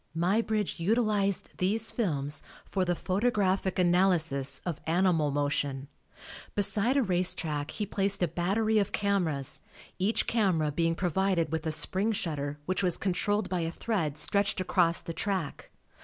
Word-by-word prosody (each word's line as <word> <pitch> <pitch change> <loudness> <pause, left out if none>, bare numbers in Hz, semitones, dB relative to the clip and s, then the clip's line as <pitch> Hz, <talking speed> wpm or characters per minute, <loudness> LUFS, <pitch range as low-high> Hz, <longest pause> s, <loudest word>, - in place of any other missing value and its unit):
Muybridge 210 +3 0
utilized 205 0 +1
these 210 +5 +2
films 150 - -2 0.2
for 190 - -1
the 175 -1 0
photographic 190 0 0
analysis 175 -7 +2
of 170 -5 -4
animal 165 -3 +2
motion. 145 -1 -2 0.7
Beside 210 +5 +2
a 275 - +3
race 180 -3 +1
track 150 -3 -3
he 210 - -3
placed 200 -1 0
a - - +3
battery 200 +7 +1
of 200 - -1
cameras, 175 -9 +1 0.4
each 200 +5 +1
camera 185 -9 +1
being 165 +2 0
provided 180 -2 0
with 160 0 -2
a - - 0
spring 190 +7 +1
shutter 150 -6 -3
which 185 +3 -1
was 180 -3 +1
controlled 200 +2 0
by 185 -1 -2
a 165 -1 -1
thread 165 -6 -2
stretched 200 +7 0
across 175 -2 +2
the 165 - -6
track. 190 -6 -3
185 Hz, 145 wpm, -29 LUFS, 160-200 Hz, 0.7 s, a